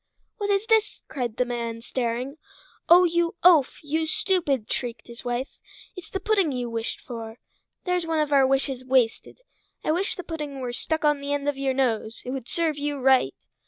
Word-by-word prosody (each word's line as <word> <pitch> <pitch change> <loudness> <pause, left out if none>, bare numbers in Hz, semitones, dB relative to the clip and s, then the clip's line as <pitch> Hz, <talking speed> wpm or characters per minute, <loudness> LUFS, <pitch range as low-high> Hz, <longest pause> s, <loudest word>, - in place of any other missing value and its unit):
"What 410 -3 -2
is 400 +1 +2
this?" 445 -2 +2
cried 240 -5 -4
the 250 - +2
man 235 -1 -4
staring. 250 +4 -3 0.5
"Oh, 350 +2 +9
you 340 -1 +1
oaf! 330 -7 +5
you 315 +2 -1
stupid!" 315 - 0
shrieked 235 -3 -4
his 235 -1 -11
wife. 245 +2 -3 0.4
"It's 360 -4 -9
the 385 - -3
pudding 395 -5 +2
you 245 -2 -3
wished 230 0 -3
for. 230 -2 -8 0.5
There's 360 -2 0
one 325 -1 0
of 300 -1 +1
our 270 -1 +6
wishes 270 -1 0
wasted. 255 - +1 0.4
I - - +1
wish 365 +5 0
the 360 - -6
pudding 300 -5 -5
were 250 -2 -4
stuck 315 +5 -1
on 295 -1 +3
the 285 0 -2
end 285 0 -2
of 290 - +1
your 270 -1 -1
nose! 230 -4 -1
It 250 - -4
would 260 -3 -5
serve 320 -3 0
you 290 0 -2
right!" 260 - +4
275 Hz, 195 wpm, -25 LUFS, 245-330 Hz, 0.5 s, Oh